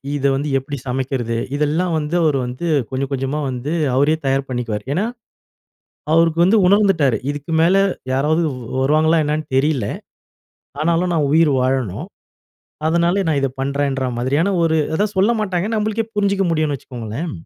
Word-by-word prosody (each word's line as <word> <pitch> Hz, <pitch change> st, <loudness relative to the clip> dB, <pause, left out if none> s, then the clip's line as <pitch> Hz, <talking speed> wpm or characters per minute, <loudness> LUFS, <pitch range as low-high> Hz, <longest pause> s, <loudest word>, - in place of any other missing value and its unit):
இத 140 Hz, -1 st, -2 dB
வந்து 145 Hz, +2 st, -2 dB
எப்படி 140 Hz, +2 st, -6 dB
சமைக்கிறது, 125 Hz, -2 st, -2 dB, 0.2 s
இதெல்லாம் 160 Hz, +4 st, 0 dB
வந்து 155 Hz, +2 st, -2 dB
அவரு 150 Hz, -3 st, +2 dB
வந்து, 125 Hz, +8 st, -5 dB, 0.2 s
கொஞ்சம் 135 Hz, +1 st, -3 dB
கொஞ்சமா 135 Hz, +2 st, -2 dB
வந்து 130 Hz, +3 st, -4 dB, 0.2 s
அவரே 145 Hz, +4 st, +3 dB
தயார் 135 Hz, 0 st, 0 dB
பண்ணிக்குவாரு. 120 Hz, -4 st, -3 dB
ஏன்னா, 195 Hz, +7 st, 0 dB, 1.1 s
அவருக்கு 165 Hz, 0 st, +3 dB
வந்து 200 Hz, +5 st, +4 dB
உணர்ந்துட்டாரு. 185 Hz, -, +3 dB
இதுக்கு 145 Hz, +3 st, -7 dB
மேல, 175 Hz, +3 st, +4 dB, 0.4 s
யாராவது 150 Hz, +5 st, +1 dB
வ் 125 Hz, -, -8 dB, 0.2 s
வருவாங்களா 155 Hz, +4 st, +3 dB
என்னென்னு 150 Hz, +1 st, -1 dB
தெரில. 135 Hz, -4 st, +1 dB, 1.0 s
ஆனாலும் 170 Hz, +2 st, +1 dB
நான் 155 Hz, -4 st, +1 dB
உயிர் 160 Hz, -1 st, +4 dB
வாழணும். 130 Hz, -, -1 dB, 0.8 s
அதனால 170 Hz, +4 st, +2 dB
நான் 150 Hz, -3 st, +1 dB
இத 135 Hz, -, +1 dB
பண்ணுறேன்ற 140 Hz, -1 st, -1 dB
மாதிரியான 145 Hz, +10 st, +1 dB
ஒரு 160 Hz, -1 st, +2 dB, 0.2 s
அதான் 210 Hz, +4 st, 0 dB
சொல்லமாட்டாங்க. 200 Hz, -3 st, +1 dB
ஏன்னா 225 Hz, -, -1 dB
நம்ளுக்கே 220 Hz, +1 st, -1 dB
புரிஞ்சுக்க 200 Hz, -1 st, +1 dB
முடியும்ன்னு 155 Hz, -3 st, 0 dB
வச்சுக்கோங்களேன். 125 Hz, +5 st, -6 dB
150 Hz, 145 wpm, -19 LUFS, 135-170 Hz, 1.1 s, வந்து